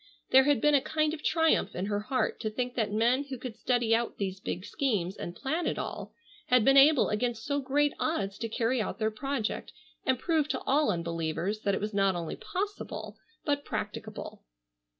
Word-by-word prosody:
There 265 0 +7
had 285 -6 +3
been 295 - +4
a 280 - +5
kind 310 +1 0
of 310 - -6
triumph 325 -1 +2
in 185 - -2
her 205 0 -1
heart 255 +5 -1
to 220 - -2
think 245 +3 -3
that 220 -4 -1
men 240 +6 +2
who 270 -2 -6
could 245 -2 -7
study 240 -2 +1
out 230 +1 0
these 190 -2 -3
big 185 0 -4
schemes 205 -10 -1
and 175 - -6
plan 315 +5 -1
it - - -1
all, - - -5 0.4
had 250 -3 +4
been 270 - +6
able 275 0 +6
against 225 +1 -1
so 285 0 0
great 285 +2 +1
odds 200 -11 -1
to 230 - -3
carry 235 +2 +1
out - - -3
their 220 -1 0
project 265 0 -3 0.3
and 260 -1 +2
prove 315 +2 +1
to 260 -3 -2
all 290 +3 +2
unbelievers 170 +2 -2
that 200 -2 0
it - - -3
was 210 +1 -3
not 195 -2 +2
only 170 -2 -4
possible 405 +3 -5 0.3
but 285 -2 0
practicable. - - -5
245 Hz, 200 wpm, -29 LUFS, 210-285 Hz, 0.4 s, There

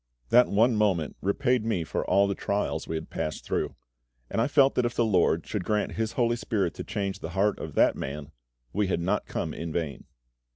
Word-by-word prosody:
That 125 +1 +6
one 115 +4 +3
moment 95 -7 +1
repaid 120 +5 +1
me 110 -7 0
for - - -2
all 100 0 +3
the 100 - 0
trials 100 +1 -2
we 80 - -3
had 80 - -5
passed 75 - -4
through; - - -2 0.6
and - - +1
I 120 - +2
felt 140 -2 +4
that 125 - +1
if 120 0 -1
the 120 - +2
LORD 90 -5 +2
should 105 -4 -3
grant 105 +2 0
HIS 110 0 -2
HOLY 120 -2 +2
SPIRIT 100 -7 -1
to - - -6
change 100 -1 -3
the - - -6
heart 105 +1 +2
of 75 -2 -7
that - - +4
man, 70 +2 -6 0.4
we 105 0 +1
had 95 - 0
not 95 +4 -1
come - - -3
in 85 0 -5
vain. 80 -3 -3
100 Hz, 215 wpm, -27 LUFS, 85-115 Hz, 0.6 s, That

